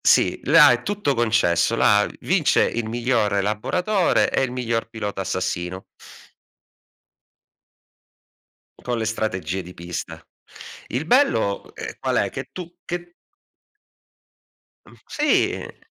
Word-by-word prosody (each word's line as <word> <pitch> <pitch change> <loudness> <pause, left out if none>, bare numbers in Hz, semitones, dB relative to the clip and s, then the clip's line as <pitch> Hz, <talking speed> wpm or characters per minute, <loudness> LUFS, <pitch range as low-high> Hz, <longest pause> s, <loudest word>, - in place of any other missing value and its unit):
Sì, - - +3
là 150 -1 +7
è 120 0 -1
tutto 205 -7 -1
concesso. 110 -3 +2
Là 105 -2 +4
vince 180 -4 +2
il 115 -1 -2
miglior 115 -3 0
elaboratore 170 - +1
e - - +1
il 130 - -1
miglior 120 -2 -2
pilota 105 -3 -5
assassino. 95 0 -3 2.9
Con 120 -1 -3
le 110 - -1
strategie 95 -5 -2
di 90 +1 -12
pista. 85 -1 -7 0.6
Il 130 +5 -2
bello, 210 - +2
ehm, - - -7
qual - - -1
è? - - +1
Che - - -7
tu 175 -2 -8
che 175 0 -6 1.7
Mh - - -16
sì. 300 0 0
115 Hz, 115 wpm, -22 LUFS, 100-155 Hz, 2.9 s, là